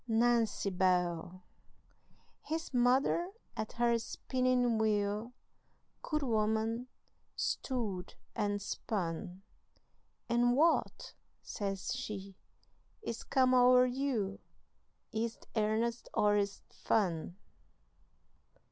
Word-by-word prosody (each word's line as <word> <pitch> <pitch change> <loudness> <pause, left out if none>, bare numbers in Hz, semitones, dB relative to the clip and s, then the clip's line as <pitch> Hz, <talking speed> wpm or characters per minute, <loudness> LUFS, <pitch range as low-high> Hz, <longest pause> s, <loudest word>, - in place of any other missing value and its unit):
Nancy 230 -3 +2
Bell!" 180 -1 0 1.0
His 320 -1 -4
mother 255 +8 +3 0.3
at 215 - -4
her 235 0 +2
spinning 250 -1 0
wheel, 210 +1 0 0.7
Good 305 -2 -1
woman, 220 0 0 0.5
stood 215 -9 -2 0.2
and 205 -2 0
spun, 190 -2 -4 0.8
"And 240 +1 +3
what," 320 +4 +2 0.3
says 195 -3 -3
she, 195 -2 -6 0.7
"is 230 - -4
come 255 -1 +3
o'er 250 0 +7
you, 245 -6 -1 0.7
Is't 225 0 -3
airnest 225 +2 0
or 205 0 +4
is't 200 -1 -1
fun?" 180 -4 0
225 Hz, 85 wpm, -33 LUFS, 200-245 Hz, 1.0 s, o'er